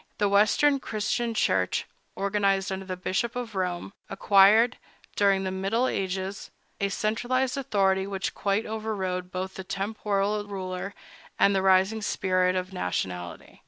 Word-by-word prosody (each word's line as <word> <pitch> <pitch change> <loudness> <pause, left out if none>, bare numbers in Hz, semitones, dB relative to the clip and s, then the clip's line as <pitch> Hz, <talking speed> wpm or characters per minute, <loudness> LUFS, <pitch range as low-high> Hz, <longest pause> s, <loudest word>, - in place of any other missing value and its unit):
The 205 - +2
Western 215 +8 +4
Christian 230 0 -2
Church, 90 - +1 0.3
organized 195 0 +1
under 190 0 -4
the 185 -1 -4
Bishop 190 +6 -2
of 245 -3 -4
Rome, 185 0 -3 0.2
acquired, 210 +4 +5 0.4
during 195 -1 +3
the 190 - -2
middle 195 +7 0
ages, 190 -1 -3 0.3
a 200 - 0
centralized 245 +5 0
authority 195 -7 +1
which 195 -1 -3
quite 200 +2 0
overrode 195 -5 -3
both 185 +1 -4
the 190 - -7
temporal 205 +1 -1
ruler 190 0 -5 0.4
and 200 - +4
the 190 - +2
rising 190 +3 +3
spirit 185 -2 +1
of 185 +1 -3
nationality. 90 - -4
195 Hz, 135 wpm, -27 LUFS, 190-215 Hz, 0.4 s, acquired